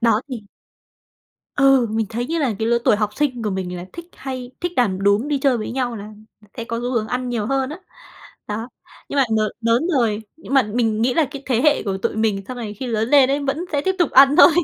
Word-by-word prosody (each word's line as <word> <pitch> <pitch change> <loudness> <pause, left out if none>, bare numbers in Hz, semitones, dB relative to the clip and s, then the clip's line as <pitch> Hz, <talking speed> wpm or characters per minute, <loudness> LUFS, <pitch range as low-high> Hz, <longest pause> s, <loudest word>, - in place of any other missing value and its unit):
Đó 230 -2 +3
thì 255 - -4 1.2
Ừ, 270 -4 +4
mình 220 0 -1
thấy 240 +2 -3
như 330 +5 -2
là 265 -7 +1
cái 225 - 0
lứa 235 - +3
tuổi - - +5
học 210 -1 0
sinh 260 -5 -1
của 210 - 0
mình 185 -2 -4
là 175 - -7
thích 340 0 -8
hay 255 -2 -6
thích 350 0 -1
đàn 195 -6 +1
đúm, 200 +6 +3
đi 290 -2 0
chơi 265 -3 +2
với 215 - -4
nhau 245 -2 -2
là 210 +1 -8 0.5
sẽ 230 - -3
có 230 0 -4
xu 245 +1 -3
hướng 225 -3 -1
ăn 250 +1 -2
nhiều 230 -4 -2
hơn 270 +2 0
á, 310 - -7 0.7
đó. 220 +3 -4 0.4
Nhưng - - -4
mà 275 - +5
n - - +3 0.2
lớn 230 +7 +2
rồi, 220 -2 0
nhưng 300 -4 -6
mà 270 - +6
mình 220 0 0
nghĩ 245 +1 +2
là 320 - +3
cái 280 -2 -8
thế 245 -3 +1
hệ 300 -1 +3
của 195 -2 -3
tụi 195 - -2
mình 215 -3 0
sau 255 - -5
này 215 -3 -6
khi 255 +5 -6
lớn 225 0 -1
lên 275 -2 +5
ấy, 280 - +1
vẫn 285 +4 -2
sẽ 285 - +1
tiếp 380 +4 0
tục 345 - +2
ăn 275 +2 +6
thôi. - - +9
245 Hz, 255 wpm, -21 LUFS, 220-270 Hz, 1.2 s, thôi